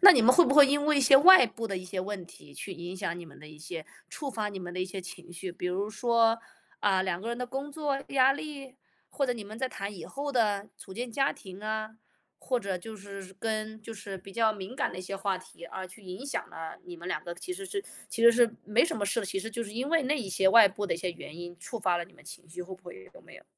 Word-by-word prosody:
那 395 - +13
你 265 -9 +6
们 250 +3 +6
会 350 - +8
不 275 - +2
会 290 0 +9
因 290 +1 +2
为 305 - +4
一 - - +4
些 270 +1 +8
外 350 -1 +10
部 230 0 -7
的 195 - -2
一 185 - -5
些 185 +1 -3
问 190 -2 -5
题 145 -4 -15
去 190 - -6
影 175 +1 -7
响 185 -3 -2
你 175 - -8
们 160 - -15
的 155 - -12
一 155 - -13
些 155 +1 -7 0.2
触 290 - -5
发 220 -5 -2
你 200 -2 -6
们 175 -1 -7
的 185 - -2
一 - - +1
些 190 +1 -6
情 175 -1 -10
绪？ 175 +1 -5
比 175 - -8
如 195 +3 -1
说， 230 0 +3 0.4
啊， 195 -2 +3
两 185 -2 -1
个 225 - -5
人 235 +1 -2
的 250 - -2
工 270 +3 -4
作 285 -2 -2
压 270 -1 +5
力， 275 -2 -7 0.4
或 280 - 0
者 250 - +1
你 225 -3 -7
们 215 +2 -9
在 260 +2 -1
谈 200 -3 -5
以 - - -8
后 285 +1 -4
的， 210 -5 +1
组 190 - -11
建 240 +5 -4
家 270 +3 +2
庭 190 0 -11
啊。 215 0 -3 0.4
或 255 - 0
者 195 -4 -2
就 220 +5 -9
是 195 -1 -9
跟 220 0 -3
就 225 - -7
是 200 -2 -7
比 195 +2 -12
较 220 +1 +3
敏 210 +4 -8
感 280 - 0
的 - - -8
一 185 - -5
些 195 +2 -5
话 195 -1 0
题， 185 -2 -12
啊， 185 +2 -6
去 185 +3 -13
影 185 +7 -7
响 280 - -3
了 165 0 -7
你 175 -1 -9
们 170 +2 -7
两 - - -2
个。 175 - -5
其 365 - -6
实 390 +2 -6
是 395 +1 -3 0.3
其 230 - -3
实 235 - +10
是 235 0 +5 0.2
没 210 +3 +4
什 335 - -2
么 205 - -1
事 200 - 0
的， 215 - -1
其 195 +1 -2
实 225 +3 -5
就 235 +1 -3
是 205 - -9
因 250 +5 -2
为 325 -2 +3
那 290 +4 +2
一 235 -8 -4
些 190 +1 +3
外 220 +1 +9
部 205 +2 -4
的 - - 0
一 - - -4
些 180 +1 -2
原 165 -2 -10
因， 175 0 -8
触 225 +5 -6
发 180 -3 +2
了 175 - -2
你 - - -22
们 - - -19
情 175 +1 -11
绪， 175 +2 -6
会 185 +2 -10
不 190 - -31
会？ 135 - -11
有 - - -15
没 - - -15
有？ - - -13
205 Hz, 320 characters per minute, -29 LUFS, 185-250 Hz, 0.4 s, 那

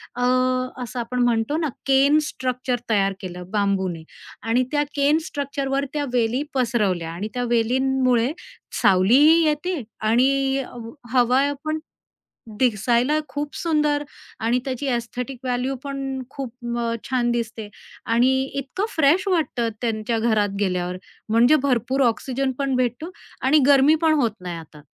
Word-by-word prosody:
अ, 245 - -4 0.6
असं 245 +1 -6
आपण 250 +2 -3
म्हणतो 240 +5 +1
ना, 325 - 0 0.2
केन 275 +3 +4
स्ट्रक्चर 255 -3 -2
तयार 195 -3 +2
केलं 180 -1 -7
बांबूने 190 -5 0 0.4
आणि 245 +3 +3
त्या 295 0 +2
केन 285 +2 +3
स्ट्रक्चरवर 280 -1 -2
त्या 295 -1 -1
वेली 240 +2 +1
पसरवल्या 210 -10 0
आणि 185 +5 -4
त्या 245 - -2
वेलींमुळे 255 +1 +2 0.5
सावलीही 265 - +5
येते 305 +2 -1 0.2
आणि 270 +5 +2
अ, 265 - -5 0.4
हवा 250 +1 +4 0.2
पण 310 0 -1 0.8
दिसायला 240 +5 +2
खूप 290 +2 -5
सुंदर 300 -3 +1 0.4
आणि 235 +3 +1
त्याची 270 +1 -3
एस्थेटिक 245 +1 -3
व्हॅल्यू 250 +2 -1
पण 270 -1 -4
खूप 265 -4 -6 0.3
अ, 230 -1 -1
छान 245 -2 +1
दिसते 225 -2 -3 0.5
आणि 245 +3 +4 0.2
इतकं 280 +9 -3
फ्रेश 320 +6 +3
वाटतं 310 -10 0
त्यांच्या 225 0 -1
घरात 215 -3 +1
गेल्यावर, 180 -2 -1 0.3
म्हणजे 235 +7 +5
भरपूर 265 0 0
ऑक्सिजन 260 +3 0
पण 275 -2 0
भेटतो 255 +7 -1 0.3
आणि 280 +4 +4
गरमी 280 +2 +6
पण 320 -1 +4
होत 235 - +2
नाही 180 -2 -5
आता. 155 -2 -13
250 Hz, 135 wpm, -23 LUFS, 230-275 Hz, 0.8 s, गरमी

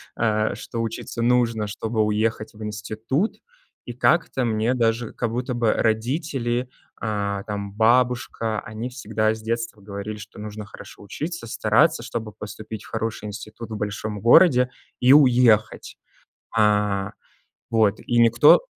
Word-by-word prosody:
Э, 110 -2 +1
что 115 -1 -5
учиться 115 +1 -4
нужно, 115 -3 +2
чтобы 110 +2 -2
уехать 110 +1 -1
в 110 0 -10
институт, 110 - -2 0.5
и 120 - -6
как-то 130 0 +2
мне 110 +1 +1
даже 115 -1 0
как 115 -2 -2
будто 125 +2 -2
бы 120 -2 +2
родители, 120 +1 -1 0.3
э, 100 -2 -2
там, 100 -1 -4
бабушка, 115 -1 +1
они 110 +3 -6
всегда 110 -3 -1
с 110 - -9
детства 115 -2 -3
говорили, 100 +1 -6
что 105 +1 -11
нужно 105 0 -7
хорошо 100 - -13
учиться, 155 - -5
стараться, 115 +9 +2
чтобы 110 -2 -5
поступить 110 +1 -8
в - - -14
хороший 110 -1 -3
институт 110 +2 -8
в - - -3
большом 105 0 -4
городе 125 - +6 0.3
и 125 +2 +6
уехать. 125 -6 +4 0.6
Э, 105 -2 +2 0.6
вот, 110 -2 +2
и 120 - -1
никто 120 +4 +6
110 Hz, 140 wpm, -23 LUFS, 105-120 Hz, 0.6 s, городе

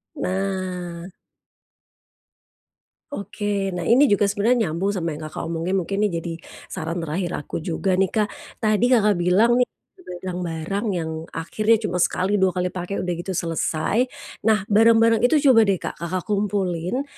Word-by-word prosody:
Nah. 185 - -3 2.0
Oke. 205 -3 -2
Nah 175 - -3
ini 255 +9 +5
juga 205 -3 +3
sebenernya 215 0 +2
nyambung 180 +6 -1
sama 170 -3 -2
yang 155 +1 -6
Kakak - - -6
omongin, 170 +3 -1
mungkin 195 +4 -3
ini 210 - +3
jadi 170 - -4 0.4
saran 165 +2 -3
terakhir 170 +3 -2
aku - - -8
juga 180 +3 -1
nih, 195 -1 +3
Kak. 215 -2 +2 0.4
Tadi 215 +1 +3
Kakak 210 -5 +4
bilang 210 +8 +4
nih, 250 - +3 0.6
barang-barang 180 +2 -3
yang 160 -2 -2 0.2
akhirnya 215 +7 +2
cuma 180 -3 -1
sekali, 190 +3 +1
2 190 -1 +2
kali 180 0 -1
pake 180 +2 -4
udah 180 - -2
gitu 175 +3 -5
selesai. 170 +8 0 0.4
Nah, 215 -3 +3
barang-barang 225 +1 +5
itu 250 +5 +4 0.2
coba 225 -3 +5
deh 195 - +3
Kak, - - -6
Kakak 175 +1 -3
kumpulin, 200 +1 -1
190 Hz, 150 wpm, -23 LUFS, 175-210 Hz, 2.0 s, ini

